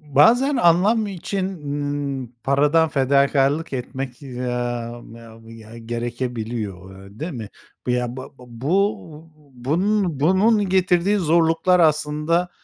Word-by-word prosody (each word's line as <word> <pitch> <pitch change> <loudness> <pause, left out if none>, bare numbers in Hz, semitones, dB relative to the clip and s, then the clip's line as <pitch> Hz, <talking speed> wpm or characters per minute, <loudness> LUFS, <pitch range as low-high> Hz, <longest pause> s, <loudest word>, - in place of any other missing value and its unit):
Bazen 245 - +5
anlam 200 +5 +3
için, 195 0 -3 0.8
ııı, - - -9 0.2
paradan 150 +4 +3
fedakârlık 140 +1 +2
etmek, 130 +1 -5
aaa, 120 -2 -4
ya 115 -1 -13
ya 115 0 -12
gerekebiliyor, 115 -4 -5
ııı, 95 +2 -14
değil 165 +4 -4
mi? 115 -7 -7 0.4
Ya, 125 0 -1
bab 130 - -8
bu 155 - -2 0.2
bunun, 170 - 0
bunun 195 +6 +3
getirdiği 185 +1 +2
zorluklar 165 +1 +2
aslında, 155 +2 +1
145 Hz, 105 wpm, -21 LUFS, 120-175 Hz, 0.8 s, Bazen